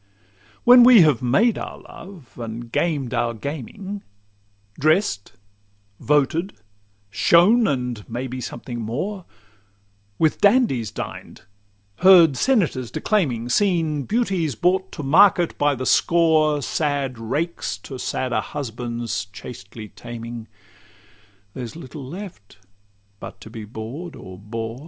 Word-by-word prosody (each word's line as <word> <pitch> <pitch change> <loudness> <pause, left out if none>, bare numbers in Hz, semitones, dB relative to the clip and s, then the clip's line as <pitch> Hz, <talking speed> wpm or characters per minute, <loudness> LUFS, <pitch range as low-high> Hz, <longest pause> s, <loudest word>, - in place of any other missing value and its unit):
When 245 0 +8
we 240 -4 +8
have 150 -7 +2
made 200 - +2
our - - -7
love, 170 -8 -13
and 115 0 -7
gamed 145 -7 -1
our 120 -1 0
gaming, 160 - -6 0.8
Drest, 155 - +1 0.7
voted, 150 +6 +1 0.6
shone, 205 - +4
and, 125 - -3
may 120 +3 -4
be, 130 0 -6
something 120 -1 -6
more; 170 - -4 0.9
With 160 -1 +1
dandies 200 - +3
dined; - - -8 0.5
heard 175 -5 +7
senators 165 - +1
declaiming; 130 - -1
Seen 165 - +1
beauties 190 - -1
brought 185 - +1
to 150 - -6
market 175 +4 +4
by 145 -1 +2
the 130 0 -5
score, 155 -3 +3
Sad 140 -5 -2
rakes 150 - -3
to 130 -2 -8
sadder 125 -3 -1
husbands 120 -6 -4
chastely 105 +1 -10
taming; 115 0 -8 1.1
There's 125 -1 -7
little 150 -2 -9
left 145 - -10 0.6
but - - -10
to 110 - -11
be 110 -2 -8
bored 125 - -8
or 95 0 -11
bore. 115 +3 -6
140 Hz, 115 wpm, -22 LUFS, 120-175 Hz, 1.1 s, When